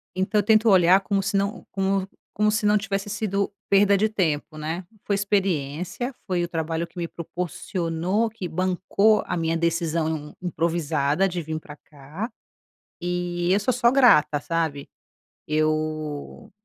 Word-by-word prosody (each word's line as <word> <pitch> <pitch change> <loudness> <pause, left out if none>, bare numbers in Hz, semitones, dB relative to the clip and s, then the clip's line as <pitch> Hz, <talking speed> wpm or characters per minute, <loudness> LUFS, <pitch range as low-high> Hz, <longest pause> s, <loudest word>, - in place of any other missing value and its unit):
Então 195 +3 +1
tento 220 +1 +4
olhar 185 0 +6
como 195 0 0
se 200 +1 -2
não 200 +3 -1
como 195 0 0 0.3
como 210 0 +3
se 215 0 0
não 210 0 +5
tivesse 200 0 -3
sido 200 -2 -1 0.2
perda 200 0 +5
de 215 +2 +2
tempo, 155 -6 -1
né. 160 +4 -4 0.2
Foi 205 - 0
experiência, 195 - -1
foi 180 -2 0
o - - -1
trabalho 165 0 -2
que - - -22
me 170 -1 -2
proporcionou, 175 +4 -2
que 205 -5 -6
bancou 185 +5 +2
a - - -1
minha 165 0 0
decisão 160 -2 -1
improvisada 165 -1 0
de 175 -1 -3
vim 160 +1 -4
pra 150 -1 -12
cá, 150 - -8 0.7
e 175 0 -1
eu 200 - +3
sou 250 +5 +1
só 235 -1 +3
grata, 150 - +5
sabe? 160 -3 -2 0.6
Eu 155 -1 -2
180 Hz, 150 wpm, -24 LUFS, 160-200 Hz, 0.7 s, olhar